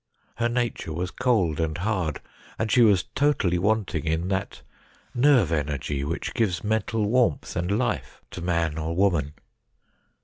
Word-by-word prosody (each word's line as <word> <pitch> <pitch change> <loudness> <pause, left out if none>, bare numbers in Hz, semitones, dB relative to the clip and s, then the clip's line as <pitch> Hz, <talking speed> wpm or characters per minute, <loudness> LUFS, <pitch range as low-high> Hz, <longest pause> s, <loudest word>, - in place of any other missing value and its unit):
Her 120 0 +1
nature 120 -8 -2
was 90 +4 -3
cold 105 - +1
and 80 -1 -1
hard; 90 -5 -1 0.4
and 110 -1 -1
she 125 - +5
was 100 -6 +5
totally 130 -12 +2
wanting 100 -5 0
in 80 +3 -1
that 95 0 -3 0.5
nerve 125 - +4
energy 75 -2 -2
which 80 +4 -3
gives 95 -8 0
mental 110 0 0
warmth 105 - +1
and 90 +4 0
life 125 - -2
to - - -7
man 85 -2 0
or 80 +1 -3
woman. 85 -7 +1
90 Hz, 145 wpm, -25 LUFS, 80-110 Hz, 0.5 s, she